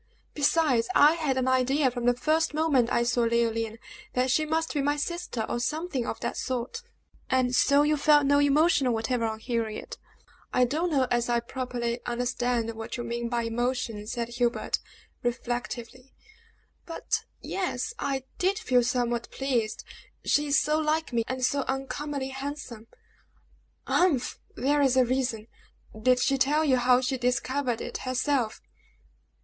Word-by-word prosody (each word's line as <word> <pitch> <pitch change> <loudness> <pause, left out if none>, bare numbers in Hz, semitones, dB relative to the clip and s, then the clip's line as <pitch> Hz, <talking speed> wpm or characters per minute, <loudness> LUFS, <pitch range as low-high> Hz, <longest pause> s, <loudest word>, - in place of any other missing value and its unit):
Besides, 290 -5 +2
I 295 +2 +7
had 305 -6 -1
an 260 0 0
idea 260 +1 +2
from 245 -1 -3
the 245 - +4
first 310 +4 +1
moment 290 -7 +2
I 235 - +2
saw 240 0 +1
Leoline 230 -1 0 0.4
that 255 +1 +1
she 310 +3 +2
must 320 +1 -1
be 290 - 0
my 290 +1 +1
sister, 340 -7 -3
or 240 - -2
something 300 0 -2
of - - -4
that 235 - -3
sort." 255 - -3 0.5
"And 255 -1 +2
so 280 +3 +4
you 300 0 +2
felt 295 0 +5
no 285 +1 +4
emotion 290 -2 +3
whatever 230 +1 -1
on 220 -1 -2
hearing 225 -2 -2
it?" - - -9 0.5
"I 250 - +4
don't 315 +8 -1
know 275 -5 +2
as 240 0 +1
I 240 0 +3
properly 240 -1 -3
understand 245 -1 -1
what 225 +2 -6
you 240 - -4
mean 235 0 -3
by 235 -1 0
emotion," 230 -2 -2
said 235 +1 -4
Herbert, 240 0 0 0.4
reflectively. 240 +1 -4 0.7
"But 330 - -2 0.2
ye - - -8
e 390 - 0
s, 355 - -2
I 270 - -1 0.2
did 380 +3 +2
feel 255 -12 +2
somewhat 240 -1 -1
pleased 245 -5 -2 0.4
she 295 0 +2
is 285 - +4
so 305 +1 +1
like 310 -2 0
me, 230 -1 +2
and 260 -1 -1
so 280 +3 +1
uncommonly 270 +1 -3
handsome!" 270 -4 -7 1.0
"Humph! 315 -9 +1 0.2
there's 275 0 +2
a 255 - +5
reason! 245 -3 -1 0.5
Did 250 +3 +3
she 270 +2 +1
tell 295 +4 +3
you 260 -3 +4
how 250 0 +4
she 260 0 -1
discovered 250 0 0
it - - -5
herself?" 255 -2 -1
255 Hz, 160 wpm, -27 LUFS, 240-285 Hz, 1.0 s, I